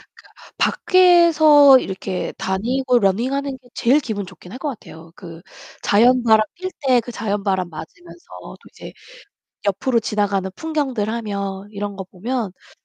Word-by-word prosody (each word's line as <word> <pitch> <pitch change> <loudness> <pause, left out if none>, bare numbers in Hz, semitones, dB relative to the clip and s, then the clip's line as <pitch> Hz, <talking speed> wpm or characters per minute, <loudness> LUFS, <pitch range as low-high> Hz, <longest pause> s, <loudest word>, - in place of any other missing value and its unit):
그러니까 - - -20
밖에서 320 -7 +5
이렇게 190 -2 -5
다니고 245 +6 0
러닝하는 260 +7 -1
게 250 -1 -24
제일 260 +5 +2
기분 215 -8 -5
좋긴 180 0 -14
할 - - -9
것 300 - -3
같아요. 165 - -11
그 165 -2 -11 0.4
자연바람 235 +1 +4 0.2
뛸 370 +1 -5 0.2
때 250 -2 +4
그 245 - -9
자연바람 200 -5 -2
맞으면서 175 - -12 0.2
또 - - -11
이제 - - -12 0.7
옆으로 230 +5 0
지나가는 205 -3 -1
풍경들 275 -9 -2
하며 200 -4 -4
이런 205 -1 -5
거 190 - -6
보면, 215 +3 -4
이제 - - -24
225 Hz, 315 characters per minute, -20 LUFS, 195-265 Hz, 0.7 s, 밖에서